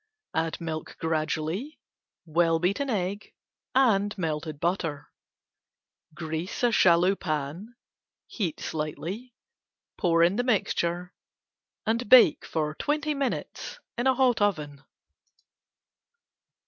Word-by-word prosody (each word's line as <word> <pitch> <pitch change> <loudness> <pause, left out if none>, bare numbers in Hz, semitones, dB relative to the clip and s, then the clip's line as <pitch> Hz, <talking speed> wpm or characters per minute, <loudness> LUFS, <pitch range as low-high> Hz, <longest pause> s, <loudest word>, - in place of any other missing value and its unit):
Add 160 0 -1
milk 160 -2 -5
gradually, 160 - -2 0.5
well 165 0 +2
beaten 200 - 0
egg 200 -2 -3 0.4
and 210 -6 +3
melted 155 -3 -3
butter. 165 -4 -2 1.0
Grease 165 +7 -3
shallow 180 -2 +5
pan, 160 +6 -4 0.5
heat 180 -9 -3
slightly, 165 - -5 0.6
pour 165 -1 +4
in 180 +4 +3
mixture 180 -6 0 0.7
and 230 0 0
bake 255 -2 +7 0.3
twenty 300 +1 0
minutes 280 - -3 0.2
in 240 +2 0
hot 255 -3 +3
oven. 150 -8 -1
180 Hz, 85 wpm, -27 LUFS, 160-230 Hz, 1.0 s, bake